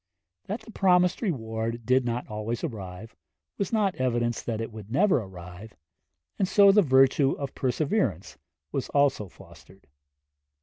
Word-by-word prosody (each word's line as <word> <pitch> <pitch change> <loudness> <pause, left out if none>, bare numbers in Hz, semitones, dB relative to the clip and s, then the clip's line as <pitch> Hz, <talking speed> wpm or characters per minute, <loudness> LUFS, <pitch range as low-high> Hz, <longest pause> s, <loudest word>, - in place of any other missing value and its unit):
That - - -4
the 225 - -13
promised 180 -3 +3
reward 115 - -3
did 130 +1 +3
not 120 +1 -3
always 110 +2 -4
arrive, 110 - -7 0.4
was 200 - -2
not 210 -4 +1
evidence 120 -2 -1
it 115 0 -3
would 110 -2 -10
never 190 - +3
arrive; 95 +1 -10 0.6
and 190 - +2
so 200 +1 +6
the 210 +1 +5
virtue 135 -2 +4
of 140 -2 -5
perseverance 130 - -1 0.3
was - - -3
also 140 -8 +1
fostered. 95 +3 -17
125 Hz, 135 wpm, -26 LUFS, 110-175 Hz, 0.6 s, so